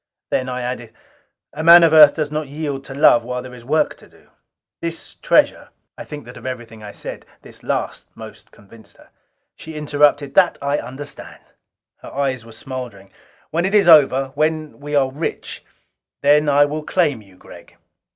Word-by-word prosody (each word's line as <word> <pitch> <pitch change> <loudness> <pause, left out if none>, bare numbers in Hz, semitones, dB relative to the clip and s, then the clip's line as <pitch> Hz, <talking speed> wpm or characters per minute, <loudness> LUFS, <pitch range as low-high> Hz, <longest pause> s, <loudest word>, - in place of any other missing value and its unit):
Then 130 0 -1
I 125 0 -4
added, 120 -2 -6 0.6
"A 155 - -5
man 170 +1 +9
of 165 -1 +4
Earth 150 -2 +8
does 150 -2 -3
not 155 -1 -3
yield 145 -1 -5
to 135 - -9
love 120 -4 +5
while 125 +1 -5
there 130 -1 -11
is 120 -1 -12
work 150 +6 0
to - - -18
do. - - -25 0.5
This 165 0 -6
treasure - - +1
" - - -56
I - - -9
think 145 -5 -9
that 125 - -12
of - - -13
everything 120 -3 -8
I 105 -1 -9
said, - - -9 0.2
this - - -14
last - - -4
most - - -12
convinced 110 +2 -19
her. - - -21 0.4
She 160 0 -10
interrupted, 145 -1 +1
"That 185 -2 +3
I 140 +1 -1
understand." 140 +3 -9 0.5
Her - - -12
eyes 135 -3 -2
were 115 - -14
smoldering. 110 -5 -9 0.4
"When 170 +2 0
it 195 +3 0
is 205 -4 +4
over 135 -4 +5
when 155 -1 -2
we 145 +1 -5
are 135 -2 +2
rich 150 +5 -6 0.6
then 150 +1 +4
I 145 0 +5
will 150 +2 -4
claim 150 -7 0
you, 95 -3 -20
Gregg." - - -16
140 Hz, 185 wpm, -19 LUFS, 125-155 Hz, 0.6 s, man